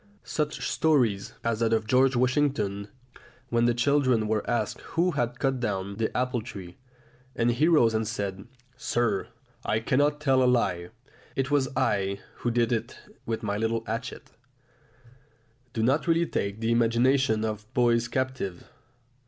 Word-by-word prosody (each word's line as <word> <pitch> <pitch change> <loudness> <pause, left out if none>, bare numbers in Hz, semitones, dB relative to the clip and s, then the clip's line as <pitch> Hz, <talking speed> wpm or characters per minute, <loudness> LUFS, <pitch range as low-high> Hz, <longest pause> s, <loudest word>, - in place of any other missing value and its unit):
Such 150 -1 -2
stories 120 -11 +1
as 115 -2 0
that 115 -1 +2
of 110 -1 +1
George 130 +3 +3
Washington 125 -6 +1 0.6
when 120 0 +2
the 120 - +3
children 130 -3 +2
were 110 -1 -1
asked 110 -3 -1 0.2
who 180 +2 +3
had 120 -5 -2
cut 135 -1 0
down 100 -4 -3
the 110 -1 0
apple 125 -1 0
tree, 95 -6 -9 0.6
and 120 0 +2
he 130 +7 +2
rose 135 -10 +4
and 110 0 0
said, 100 -3 -4 0.3
"Sir, 120 -5 0 0.4
I 110 - 0
cannot 145 +5 +1
tell 135 -3 +3
a 125 - +4
lie; 90 -8 0 0.5
it 135 0 -1
was 140 -3 +2
I 100 0 +1 0.2
who 120 - -1
did 120 0 +1
it 115 -2 -2 0.3
with 115 0 -2
my 100 -1 -1
little 115 +1 -1
hatchet" 115 +3 -5 1.4
do 110 -1 -2
not 135 +8 +2
really 165 0 +3
take 100 -7 -3
the 115 +1 +1
imagination 115 0 +3
of 110 +1 -5
boys 120 -1 +3
captive. 130 -8 -3
120 Hz, 155 wpm, -27 LUFS, 110-130 Hz, 1.4 s, rose